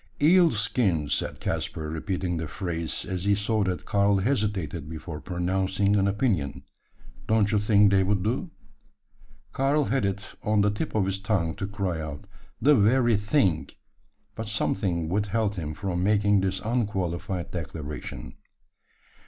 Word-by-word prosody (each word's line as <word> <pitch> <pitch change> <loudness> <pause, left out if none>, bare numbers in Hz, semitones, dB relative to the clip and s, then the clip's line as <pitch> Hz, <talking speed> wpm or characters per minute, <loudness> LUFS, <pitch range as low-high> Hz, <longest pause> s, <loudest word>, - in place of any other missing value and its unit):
"Eel 170 +3 +6
skins," 105 - 0
said - - -3
Caspar, 80 - -3
repeating 90 +1 -2
the 80 -1 -3
phrase, 85 -2 -3
as 95 0 -4
he 100 0 +4
saw 105 +1 +1
that 90 -1 -3
Karl 100 0 +3
hesitated 100 - -1
before 80 -1 -7
pronouncing 95 +3 0
an 100 -1 +3
opinion. 100 - 0 0.6
"Don't 110 -1 +3
you 105 - +3
think 105 -1 +4
they 95 -1 +4
would 95 0 +1
do?" 125 - -1 1.0
Karl 140 +3 +2
had 135 -2 0
it 100 0 -1 0.2
on 105 -1 +2
the 105 0 +3
tip 105 - -4
of 105 -3 +2
his 95 0 -2
tongue 95 -5 0
to 95 - -4
cry 95 -5 -2
out 75 +5 -7 0.3
"The 150 - +5
very 120 +1 +4
thing!" 105 - +1 0.6
but 110 - -6
something 95 -5 -1
withheld 105 +3 0
him 80 -5 -5
from 90 -1 -2
making 105 0 +3
this 95 0 -1
unqualified 95 -5 -2
declaration. 75 -6 -6
100 Hz, 145 wpm, -26 LUFS, 90-105 Hz, 1.0 s, Eel